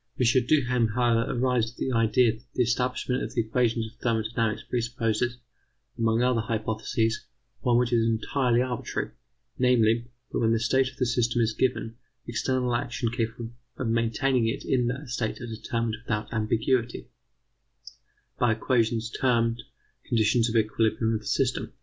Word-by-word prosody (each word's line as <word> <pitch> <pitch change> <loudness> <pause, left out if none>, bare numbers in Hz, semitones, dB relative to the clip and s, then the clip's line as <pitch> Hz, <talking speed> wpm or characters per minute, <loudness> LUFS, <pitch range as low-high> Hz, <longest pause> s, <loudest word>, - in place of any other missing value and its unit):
M. 125 - +3 0.2
Duhem, 125 -6 +3
however, 120 -2 +2
arrives 125 -2 +1
at 120 - -18
the 130 - -2
idea 115 0 +3
that 120 +2 -15
the 125 - +3
establishment 125 +1 -1
of - - -5
the 120 - +3
equations 115 0 0
of 110 - -10
thermodynamics 110 -1 -1
presupposes, 120 0 -1 0.6
among 115 +1 +1
other 125 -2 +2
hypotheses, 110 0 -1 0.3
one 120 -1 +2
which 125 0 +1
is 115 -1 +4
entirely 120 +2 +1
arbitrary, 125 -2 -3 0.5
namely: 120 -2 +3 0.3
that - - -1
when 115 0 +3
the 115 - +2
state 130 +3 +2
of 130 - -18
the 130 - +1
system 120 0 +1
is 115 -1 +2
given, 115 -2 -1 0.3
external 125 +1 -1
actions 120 -1 -2
capable 115 -1 -3 0.3
of 125 - -2
maintaining 115 +2 +1
it 115 - -3
in 125 -2 +1
that 130 +4 -4
state 120 -3 -2
are 120 - -6
determined 115 0 -3
without 105 -2 -3
ambiguity, 115 +2 0 1.3
by 120 -2 +3
equations 115 0 0
termed 115 -2 +1 0.4
conditions 115 +1 +2
of 115 - -4
equilibrium 110 +1 +1
of 110 - 0
the 105 - -11
system. - - 0
115 Hz, 155 wpm, -27 LUFS, 115-125 Hz, 1.3 s, is